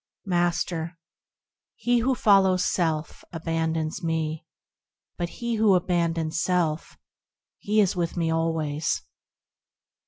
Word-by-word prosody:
Master. 175 -2 -1 0.8
He 245 0 +1
who 255 +3 +1
follows 195 -5 +4
self, 160 -3 -1
abandons 160 0 -2
me; 160 -1 -2 0.7
But 175 0 -3
he 235 +4 -3
who 215 -3 +5
abandons 170 -2 0
self, 170 -4 0
lo! - - -27 0.6
he 210 +1 +1
is 195 -2 +1
with 175 0 -2
me 165 -1 +1
always. 160 -2 -1
170 Hz, 105 wpm, -25 LUFS, 160-185 Hz, 0.8 s, who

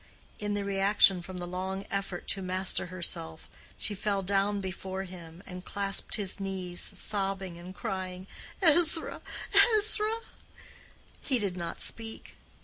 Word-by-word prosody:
In 205 0 -1
the 200 -1 -1
reaction 195 -1 +5
from 185 +1 -7
the 175 - -4
long 190 +2 -3
effort 195 -2 -3
to 195 - +1
master 185 0 -1
herself, 170 - -3 0.3
she 210 - -1
fell 200 0 0
down 200 +1 +2
before 190 0 -4
him 175 -1 -10
and 180 -1 -7
clasped 200 0 +1
his 205 -2 -1
knees, 185 -2 -3
sobbing, 195 -3 -1
and 180 +2 -9
crying, 185 -4 -4 0.4
"Ezra, 325 0 +4 0.6
Ezra!" 430 +1 +2 1.0
He 265 - +2
did 200 -5 -1
not 170 -2 -4
speak. 225 -1 -4
195 Hz, 135 wpm, -30 LUFS, 185-205 Hz, 1.0 s, reaction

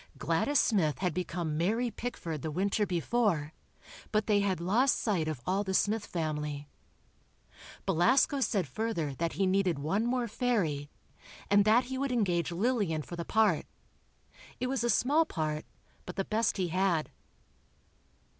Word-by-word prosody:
Gladys 165 - +1
Smith 160 - +2
had 180 -3 -1
become 170 -3 -3
"Mary 225 +7 +1
Pickford" 185 - -5
the 160 - -3
winter 200 +6 0
before, 175 -4 0 0.6
but 215 -1 +1
they 210 -2 +3
had 195 -3 0
lost 225 +10 +2
sight 185 -8 0
of 155 -6 -4
all 195 +2 +1
the 190 -1 -2
Smith 210 +2 +1
family. 150 -3 -3 1.2
Belasco 260 - +3
said 205 -7 0
further 215 -10 -2
that 165 +4 -2
he 195 - +1
needed 185 -3 +2
one 195 +11 0
more 245 -1 0
fairy, 190 - -1 0.6
and 205 0 +5
that 225 +4 +5
he 260 +1 -5
would 275 -1 -1
engage 180 -8 +1
Lillian 190 -5 0
for 175 - -8
the 170 - -4
part. 215 -5 +2 0.9
It 250 - -1
was 255 -2 -1
a 240 - +1
small 280 +8 +3
part, 155 - -3 0.4
but 180 - -6
the 195 - -1
best 220 0 0
he 185 -2 0
had. 180 -3 +1
195 Hz, 155 wpm, -30 LUFS, 165-230 Hz, 1.2 s, and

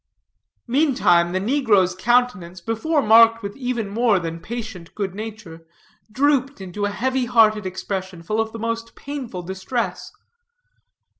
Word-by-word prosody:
Meantime, 240 - +3
the 185 - 0
negro's 205 -5 +2
countenance, 205 -4 +1
before 250 - 0
marked 230 +1 +6
with 200 0 -5
even 245 -5 -3
more 220 0 +2
than 165 -2 -4
patient 215 -5 -7
good 195 -3 -3
nature, 205 -6 -9 0.4
drooped 275 +1 +1
into 190 +2 -4
a - - 0
heavy 260 +4 -1
hearted 215 -4 +3
expression, 190 -1 -5
full 215 +6 0
of 220 0 -3
the 230 - -7
most 230 0 -4
painful 260 -10 -6
distress. 190 +7 -4
220 Hz, 135 wpm, -22 LUFS, 190-240 Hz, 0.4 s, marked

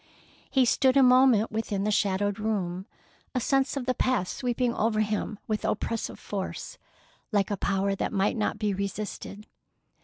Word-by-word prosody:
He 265 -2 +3
stood 260 +2 +3
a 270 - +7
moment 250 -3 +5
within 215 -3 -2
the 210 - +1
shadowed 205 0 +1
room, 190 -4 -2 0.5
a - - +2
sense 270 +3 +1
of 260 - -3
the 255 - +1
past 245 -7 0
sweeping 245 -1 0
over 215 -1 +1
him 215 0 -2
with 215 -1 -2
oppressive 225 +1 -2
force, 195 -2 -5 0.5
like 205 -2 +1
a - - +1
power 195 +1 0
that 195 - -2
might 200 -1 +1
not 215 -2 -1
be 210 -2 0
resisted. 200 +1 -5
215 Hz, 160 wpm, -27 LUFS, 200-245 Hz, 0.5 s, a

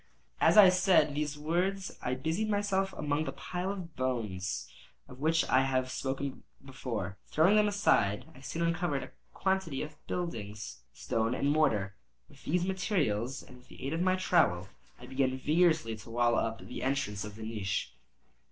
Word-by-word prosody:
As - - +5
I 200 -3 +10
said 180 -5 +4
these 150 0 -2
words 180 +5 -1
I 125 - -1
busied 160 +11 -1
myself 200 -2 +1
among 150 +1 -1
the - - -3
pile 180 +2 -4
of 180 -5 -7
bones 105 -8 -2 0.4
of 125 - -12
which 160 +3 +2
I 130 - +4
have 130 -1 0 0.7
before 125 -7 -4
spoken. - - -15
Throwing 170 +7 +4
them 210 0 +5
aside, 130 - +2
I 130 - -15
soon 165 +4 -3
uncovered 170 -4 0
a - - -10 0.2
quantity 190 -7 0
of 150 0 -10
building 115 - -3 0.4
stone 115 +2 -1
and 140 - +1
mortar. 105 -11 +2 0.3
With 140 -2 -19
these 180 +3 +1
materials 150 - -1
and 125 - -14
with 125 0 -20
the - - -10
aid 140 - -2
of 165 - -1
my 185 0 +3
trowel, 160 - +2 0.3
I 125 - -10
began 130 0 0
vigorously 155 -5 +2
to 110 +2 -12
wall 120 +1 +2
up 115 0 -1
the - - -7
entrance 130 -7 -1
of 105 -1 -8
the 110 - -8
niche. 105 -5 -3
145 Hz, 170 wpm, -31 LUFS, 120-180 Hz, 0.7 s, I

